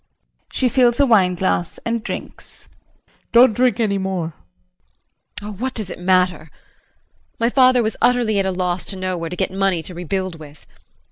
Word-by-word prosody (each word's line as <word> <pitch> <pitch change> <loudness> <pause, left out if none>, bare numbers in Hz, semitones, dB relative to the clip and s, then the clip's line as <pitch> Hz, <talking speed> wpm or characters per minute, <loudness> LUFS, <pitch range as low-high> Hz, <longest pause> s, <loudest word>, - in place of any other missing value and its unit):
[She 260 - +1
fills 245 0 +2
a 280 - +5
wine 195 -7 +3
glass 175 -1 0
and 230 -1 -2
drinks.] - - -2 0.4
JEAN. - - -36 0.2
Don't 235 -1 +7
drink 245 +1 +1
any 200 -3 +1
more. 185 -4 -3 1.1
JULIE. 210 0 -7
Oh, - - -7
what 260 0 -2
does 210 -5 -2
it - - -8
matter? 180 -2 +1 0.9
My 230 +1 +1
father 255 -2 +4
was 220 - -2
utterly 235 -4 +2
at 195 - 0
a - - 0
loss 180 -1 -2
to - - -3
know 185 -1 -3
where 165 -1 -4
to 180 - -5
get - - -2
money 190 -3 0
to 180 - -7
rebuild 180 0 -4
with. 150 -1 -14
195 Hz, 185 wpm, -20 LUFS, 180-235 Hz, 1.1 s, Don't